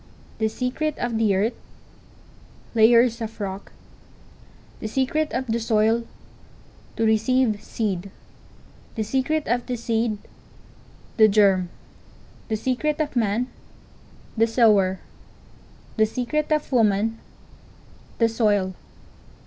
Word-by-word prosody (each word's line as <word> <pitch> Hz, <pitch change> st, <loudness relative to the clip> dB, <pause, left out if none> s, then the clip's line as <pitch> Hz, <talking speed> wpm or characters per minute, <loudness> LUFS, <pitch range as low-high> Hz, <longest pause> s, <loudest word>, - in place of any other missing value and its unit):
The 220 Hz, -, +2 dB
secret 255 Hz, +7 st, -2 dB
of 235 Hz, -2 st, -2 dB
the 210 Hz, -3 st, +3 dB
earth—layers 230 Hz, +2 st, -1 dB
of 225 Hz, -1 st, -6 dB
rock. 195 Hz, -1 st, -5 dB, 1.1 s
The -, -, -4 dB
secret 265 Hz, +6 st, 0 dB
of 255 Hz, +2 st, -2 dB
the 230 Hz, -1 st, -1 dB
soil—to 225 Hz, 0 st, -3 dB
receive 220 Hz, 0 st, +2 dB
seed. 200 Hz, -5 st, -3 dB, 0.9 s
The 220 Hz, -, -1 dB
secret 270 Hz, +7 st, 0 dB
of 240 Hz, +1 st, 0 dB
the 250 Hz, -, -2 dB
seed—the 225 Hz, -1 st, -2 dB
germ. 195 Hz, -4 st, +3 dB, 0.8 s
The 220 Hz, -, -1 dB
secret 260 Hz, +7 st, -1 dB
of 300 Hz, -3 st, -2 dB
man—the 225 Hz, 0 st, -3 dB
sower. 210 Hz, -5 st, +3 dB, 1.0 s
The 220 Hz, 0 st, +4 dB
secret 290 Hz, +7 st, -2 dB
of 305 Hz, -1 st, 0 dB
woman—the 225 Hz, +1 st, -2 dB
soil. 205 Hz, -4 st, +1 dB
225 Hz, 90 wpm, -23 LUFS, 215-250 Hz, 1.1 s, The